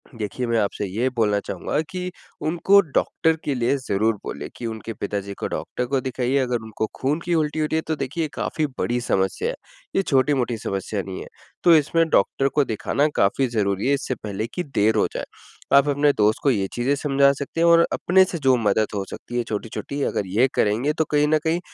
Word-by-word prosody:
देखिए 115 +3 -3
मैं 115 -1 +2
आपसे 100 0 -1
ये 115 +8 0
बोलना 105 -3 +2
चाहूँगा 95 +4 -3
कि, 180 +2 -4 0.3
उनको 175 +5 +4
डॉक्टर 160 0 0
के 140 - 0
लिए 125 +3 +1
ज़रूर 110 -3 0
बोलें - - -5
कि 120 - -6
उनके 115 0 -6
पिताजी 100 -1 -4
को - - -2
डॉक्टर 125 - -3
को 135 0 0
दिखाइए 130 +1 -1
अगर 125 -2 0
उनको 110 0 -3
खून 145 +4 0
की 175 - 0
उल्टी 155 0 0
हो 155 - +2
रही 150 - -2
है - - +1
तो 160 - 0
देखिए 155 +5 -2
काफ़ी 155 - -1
बड़ी 120 +1 0
समस्या 95 -5 0
है, - - -3 0.4
ये - - +4
छोटी-मोटी 130 -5 +1
समस्या 100 0 -3
नहीं 95 0 -6
है। - - -8 0.4
तो 170 - +7
इसमें 160 +2 +3
डॉक्टर 135 +5 +2
को 145 - +2
दिखाना 135 +6 0
काफ़ी 125 +7 +2
ज़रूरी 100 -1 0
है 140 - +3
इससे 135 -2 -3
पहले 105 0 -4
की 180 - -2
देर 110 -7 +1
हो 105 - +3
जाए, - - -3 0.5
आप 140 +1 +6
अपने 145 +1 +3
दोस्त 105 -2 +2
को 140 - +4
ये 100 -5 0
चीज़ें 120 +4 +1
समझा 140 -1 +3
सकते 140 +4 -4
हैं 170 - +5
और 170 0 +6
अपने 190 +2 +4
से 180 -2 -4
जो 135 -3 +4
मदद 110 -1 +2
हो 100 - -1
सकती 120 - -6
है 120 - +1
छोटी-छोटी 115 +6 -4
अगर 100 - -1
ये 110 +8 +3
करेंगे 115 +8 +1
तो 160 0 0
कहीं 150 0 +3
न 155 +1 +4
कहीं 165 +1 +1
130 Hz, 215 wpm, -23 LUFS, 110-150 Hz, 0.5 s, तो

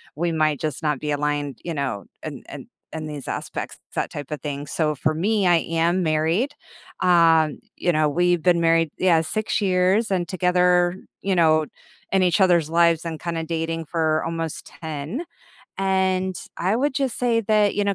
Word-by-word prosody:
we 170 +3 -1
might, 155 -3 +1
just, 155 -1 -3
not 150 -3 0
be 150 - -2
aligned, 145 -1 -1
you 170 - -3
know, 130 -9 -3 0.2
in - - -7
in - - -9 0.3
in 155 -1 -5
these 145 -3 -7
aspects, - - -5 0.2
that - - -1
type 145 0 -7
of 150 - -3
thing." 145 -1 -5
so 150 -1 0
for 155 +4 0
me, 200 +4 +1
I 175 -1 +5
am 165 +2 0
married. 165 - +1 0.5
Um, 165 -3 +4 0.2
you 175 - +1
know, 155 -1 +2
we've 175 +1 +2
been 175 -2 +3
married 165 -1 +3
yeah, 175 -3 +4
6 215 +9 -1
years 190 +3 +2
and 180 -2 0
together, 180 -1 +2 0.3
you 195 -1 0
know, 155 -2 +4 0.5
in 190 -1 +4
each 180 +2 +2
other's 170 -4 +4
lives, 170 0 +3
and, 160 -2 -4
kinda, 165 -1 -3
dating 165 0 -3
for 160 -1 0
almost 165 -1 -4
10, 160 - -6 0.6
and 190 -1 +1 0.2
I 190 +5 +1
would, 280 +3 0
just, 270 -3 -1
say 235 -2 +2
that, 210 -1 +2
you 205 - +1
know, 200 - +1
170 Hz, 180 wpm, -23 LUFS, 155-185 Hz, 0.6 s, I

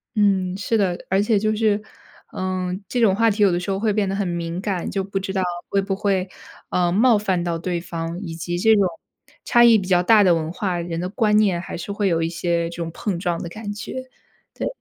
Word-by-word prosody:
嗯， 190 -3 +2
是 225 +3 0
的， 185 -4 +1
而 190 +1 +3
且 210 0 +2
就 215 +1 +1
是， 210 -1 +1 0.5
嗯， 185 +1 -3
这 245 - -1
种 205 -5 +4
话 230 +2 +3
题 210 0 +1
有 195 - +5
的 175 - 0
时 180 - -5
候 195 - 0
会 215 -1 +1
变 205 -2 +1
得 195 - -1
很 200 -1 -1
敏 170 0 -3
感， 195 -4 -2
就 195 - -2
不 195 0 -3
知 195 0 -4
道 190 -1 0 0.3
会 195 - +2
不 195 0 -2
会， 195 -2 0 0.4
呃， 175 -1 +1
冒 225 +4 +4
犯 190 -4 0
到 170 -1 -1
对 175 +1 -2
方， 165 0 -5
以 165 -4 -6
及 175 +1 -3
这 220 +4 +5
种 200 -2 +3 0.6
差 240 - +4
异 235 -2 +7
比 190 -3 -4
较 180 -2 +4
大 210 +3 +5
的 180 -2 +5
文 160 -1 -1
化， 180 -1 -2
人 170 -1 -4
的 180 - -2
观 210 -1 +1
念 190 -5 +2
还 - - -6
是 175 +4 -6
会 200 0 0
有 165 -2 +1
一 165 - 0
些 170 0 -1
这 170 - -9
种 170 -1 -3
碰 180 0 -3
撞 175 -2 -2
的 170 - -5
感 210 +2 -6
觉。 255 +5 -7 0.4
对。 - - -3
190 Hz, 265 characters per minute, -22 LUFS, 175-210 Hz, 0.6 s, 异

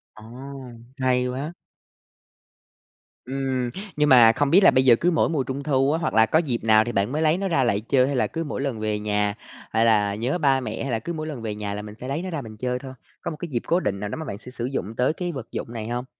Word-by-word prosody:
Ồ! 110 - -13 0.7
Hay 125 -1 +1
quá! 140 +6 -4 1.7
Ừm, 130 -2 -2 0.3
nhưng 150 0 +2
mà 120 -3 +8
không 145 +4 0
biết 195 +3 +6
là - - +8
bây 130 0 +3
giờ 120 -2 +7
cứ 175 +8 +1
mỗi 160 - +2
mùa 145 -5 0
Trung 135 +2 -5
thu, 135 -1 +2
hoặc 155 - -1
là 110 0 +6
có 155 - +3
dịp 125 -9 -2
nào 110 -1 +5
thì 120 - -4
bạn 100 +4 0
mới 155 +2 -1
lấy 160 +2 +3
nó 195 0 -2
ra 165 -7 +2
lại 100 -4 +1
chơi 130 +3 +2
hay 140 - -1
là 125 - +2
cứ 165 0 -4
mỗi 145 -3 -4
lần 135 -6 -2
về 105 -1 -1
nhà, 105 -1 0 0.4
hay 115 +1 +3
là 105 -3 +3
nhớ 125 +10 -1
ba 135 -4 +3
mẹ, 125 - -5
hay 135 - -3
là 115 - 0
cứ 170 +9 -5
mỗi 155 -1 -4
lần 140 -7 -6
về 105 -2 -4
nhà 105 -1 -4
là 105 - -4
mình 105 0 -9
sẽ 125 +2 -8
lấy 140 +5 -2
nó 185 - -5
ra 160 -4 -3
mình 110 -2 -10
chơi 125 +1 -2
thôi, 130 -1 -9 0.3
có - - -3
một 155 - -7
cái 175 - -4
dịp 120 -4 -1
cố 175 +2 +3
định 100 - -2
nào 105 0 -4
đó - - -4
mà 160 - -5
bạn 100 - -5
sẽ 125 +3 -11
sử 120 -1 -4
dụng 115 -5 -4
tới 125 +5 +2
cái 175 0 -3
vật 130 -6 -7
dụng 115 - -5
này 110 -1 -5
hông? 120 +1 -3
125 Hz, 280 wpm, -24 LUFS, 110-145 Hz, 1.7 s, mà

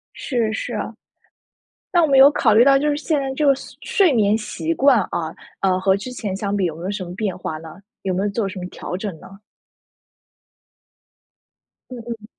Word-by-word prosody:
是， 235 -5 -1
是 240 +2 -4
啊。 210 +2 -4 1.0
那 350 - +4
我 320 - +3
们 275 -2 +4
有 270 +1 +9
考 230 -6 +3
虑 230 - +7
到 275 0 +6
就 295 +2 +1
是 290 - 0
现 305 0 0
在 270 -1 -3
这 300 - 0
个 280 - +6
岁 - - -12
睡 380 -6 +3
眠 210 -3 +3
习 320 +9 -3
惯 275 -6 +4
啊， 160 -1 -3 0.3
呃， 185 -1 +2
和 190 0 +3
之 205 +6 -6
前 205 -6 -4
相 200 +1 -2
比 195 - +1
有 165 -3 -2
没 165 - -9
有 190 - -2
什 200 -2 -4
么 175 - -8
变 200 -2 -2
化 155 - -5
呢？ 160 0 -10 0.3
有 190 - -2
没 190 +2 -1
有 205 - 0
做 200 -1 -2
什 190 - -7
么 180 - -5
调 180 - -6
整 195 -4 -5
呢？ - - -13 2.6
嗯 250 - -6
嗯。 230 -3 -6
215 Hz, 230 characters per minute, -21 LUFS, 190-270 Hz, 2.6 s, 有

